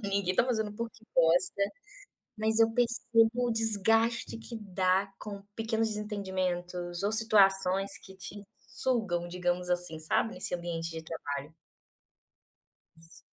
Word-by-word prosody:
ninguém 195 Hz, -2 st, 0 dB
tá 235 Hz, -, +3 dB
fazendo 220 Hz, -4 st, -1 dB
porque 225 Hz, 0 st, -7 dB
gosta, 175 Hz, +4 st, +3 dB, 0.8 s
mas 220 Hz, +1 st, 0 dB
eu 225 Hz, -, +5 dB
percebo 235 Hz, -1 st, +2 dB, 0.2 s
o -, -, -1 dB
desgaste 225 Hz, +2 st, +4 dB
que 230 Hz, 0 st, -8 dB
dá 190 Hz, 0 st, 0 dB
com 200 Hz, -1 st, -8 dB
pequenos 225 Hz, 0 st, 0 dB
desentendimentos 185 Hz, -4 st, -3 dB
ou 205 Hz, -, 0 dB
situações 195 Hz, -3 st, +3 dB
que 190 Hz, -, -13 dB
te 195 Hz, +2 st, -9 dB, 0.2 s
sugam, 190 Hz, -9 st, -2 dB
digamos 180 Hz, 0 st, -1 dB
assim, 175 Hz, -2 st, -1 dB
sabe, 160 Hz, +8 st, 0 dB
nesse 180 Hz, -, -1 dB
ambiente 170 Hz, -1 st, -4 dB
de 160 Hz, 0 st, -7 dB
trabalho. 150 Hz, -1 st, -6 dB, 1.4 s
Isso. 165 Hz, +1 st, -19 dB
195 Hz, 125 wpm, -30 LUFS, 175-220 Hz, 1.4 s, eu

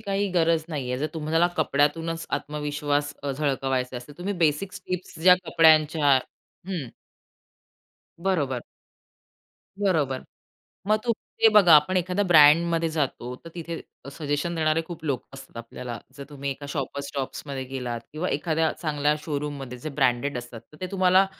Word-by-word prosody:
काही 200 Hz, -1 st, -1 dB
गरज 165 Hz, -2 st, +2 dB
नाही 140 Hz, -6 st, -3 dB
आहे. 125 Hz, -, -1 dB
जर 150 Hz, -, 0 dB
तुम्हाला 160 Hz, +2 st, +2 dB
कपड्यातूनच 160 Hz, +2 st, 0 dB
आत्मविश्वास 145 Hz, -1 st, -2 dB
अ, 140 Hz, -, -2 dB
झळकवायचा 135 Hz, -3 st, -1 dB
असेल. 135 Hz, +5 st, -10 dB
तुम्ही 190 Hz, +3 st, -2 dB
बेसिक 155 Hz, +5 st, 0 dB
टिप्स 180 Hz, 0 st, -4 dB
ज्या 180 Hz, +1 st, +9 dB
कपड्यांच्या 155 Hz, -3 st, +5 dB, 0.5 s
हं. 170 Hz, -11 st, -4 dB, 1.3 s
बरोबर. 155 Hz, -9 st, 0 dB, 1.2 s
बरोबर. 155 Hz, -10 st, +1 dB, 0.7 s
मग 215 Hz, -, +5 dB
तुम्ही 235 Hz, -1 st, -3 dB
ते -, -, +10 dB
बघा, 185 Hz, -6 st, +8 dB
आपण 150 Hz, +5 st, +4 dB
एखाद्या 185 Hz, +3 st, +1 dB
ब्रँडमध्ये 165 Hz, 0 st, +5 dB
जातो. 135 Hz, -5 st, -2 dB
तर -, -, -8 dB
तिथे 170 Hz, -1 st, -5 dB, 0.2 s
अ, -, -, -9 dB
सजेशन 145 Hz, +3 st, -2 dB
देणारे 160 Hz, 0 st, +1 dB
खूप 165 Hz, -2 st, -9 dB
लोक 135 Hz, -5 st, -1 dB
असतात 135 Hz, -2 st, -12 dB
आपल्याला. 115 Hz, 0 st, -7 dB, 0.2 s
जर 140 Hz, -, -7 dB
तुम्ही 140 Hz, -1 st, -4 dB
एका 140 Hz, +1 st, -6 dB
Shoppers 140 Hz, 0 st, -3 dB
Stopsमध्ये 135 Hz, 0 st, -4 dB
गेलात 125 Hz, -3 st, -3 dB
किंवा 160 Hz, +5 st, -2 dB
एखाद्या 160 Hz, -1 st, 0 dB
चांगल्या 150 Hz, -1 st, +1 dB
शोरूममध्ये 145 Hz, -4 st, -4 dB
जे 140 Hz, -, -5 dB
ब्रँडेड 130 Hz, +1 st, +2 dB
असतात. 120 Hz, -2 st, -9 dB
तर 150 Hz, -, -14 dB
ते 185 Hz, -, -2 dB
तुम्हाला 190 Hz, 0 st, +4 dB
150 Hz, 145 wpm, -25 LUFS, 140-170 Hz, 1.3 s, ते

